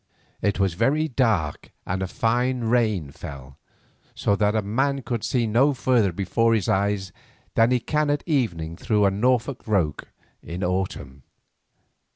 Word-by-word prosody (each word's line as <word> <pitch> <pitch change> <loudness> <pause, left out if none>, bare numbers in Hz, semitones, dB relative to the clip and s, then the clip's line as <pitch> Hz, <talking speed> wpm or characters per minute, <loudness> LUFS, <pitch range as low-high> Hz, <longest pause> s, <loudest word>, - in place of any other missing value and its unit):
It 100 - 0
was 95 -3 +2
very 135 - +1
dark 110 - 0
and 95 +1 -2
a 95 - -1
fine 120 +5 0
rain 110 - +1
fell, 70 -1 -10 0.6
so 100 - +1
that 105 +1 +1
a 110 - +1
man 135 +6 0
could 120 -2 -3
see 120 -3 +1
no 130 +6 +3
further 115 -4 +2
before 115 +6 +1
his 105 -5 -1
eyes 100 -1 0 0.4
than 115 +1 +4
he 125 0 +2
can 150 +4 0
at 145 0 0
evening 85 - -1
through 105 +1 +1
a 100 - +3
Norfolk 125 +5 0
roke 90 -9 0 0.3
in 90 +3 -6
autumn. 90 -7 -3
110 Hz, 155 wpm, -24 LUFS, 95-125 Hz, 0.6 s, than